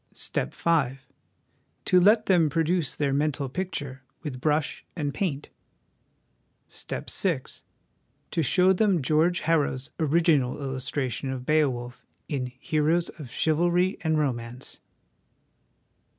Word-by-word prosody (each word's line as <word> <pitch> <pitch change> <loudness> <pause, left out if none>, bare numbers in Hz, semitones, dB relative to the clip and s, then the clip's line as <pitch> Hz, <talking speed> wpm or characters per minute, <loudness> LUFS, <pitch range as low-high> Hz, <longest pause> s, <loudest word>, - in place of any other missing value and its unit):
"Step - - -2
V. 145 -6 +1 0.9
To 180 - +5
let 215 +4 +5
them 175 -5 +4
produce 165 0 0
their 140 -2 0
mental 145 -1 0
pic 185 +8 -3
ture 135 -2 -5 0.2
with 130 -5 -5
brush 150 0 0
and 145 -5 -2
paint. 150 -5 -2 0.6
" - - -44 0.2
Step - - -6
VI. - - 0 0.9
To 165 - 0
show 180 +5 +4
them 190 -5 +2
George 160 +5 +2
Harrow's 145 -4 0
'original 155 -5 +2
illustration' 130 -1 -3
of 130 -1 -4
Beowulf 130 -5 0 0.2
in 135 -4 -2
Heroes 155 +5 +1
of 145 -6 -10
Chivalry 175 +7 +1
and 160 -1 +1
Romance? 125 -3 -3
150 Hz, 120 wpm, -26 LUFS, 135-170 Hz, 0.9 s, To